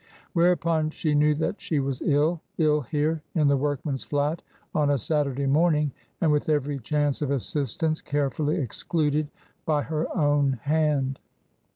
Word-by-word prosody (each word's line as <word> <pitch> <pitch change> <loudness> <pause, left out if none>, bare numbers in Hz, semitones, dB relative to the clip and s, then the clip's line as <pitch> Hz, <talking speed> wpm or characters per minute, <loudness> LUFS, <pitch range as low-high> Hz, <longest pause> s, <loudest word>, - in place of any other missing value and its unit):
Whereupon 170 -2 +2
she 155 -1 -1
knew 150 +1 +4
that 160 +7 -2
she 155 - -1
was 135 -2 -2
ill 155 +3 +2
— - - -45
ill 150 -2 +3
here 155 +3 -1
in 155 -3 +3
the 140 - +4
workman's 140 0 -2
flat 145 +3 -1 0.3
on 150 -2 +2
a 145 - +3
Saturday 140 +1 0
morning 150 +1 +2 0.3
and 160 - +3
with 150 +1 +1
every 145 -2 0
chance 145 +3 0
of 145 - -1
assistance 145 +3 -1
carefully 145 +3 -1
excluded 150 - 0 0.4
by 150 -2 +1
her 155 +2 -2
own 145 -3 +3
hand. 145 -3 +1
150 Hz, 155 wpm, -26 LUFS, 140-155 Hz, 0.4 s, knew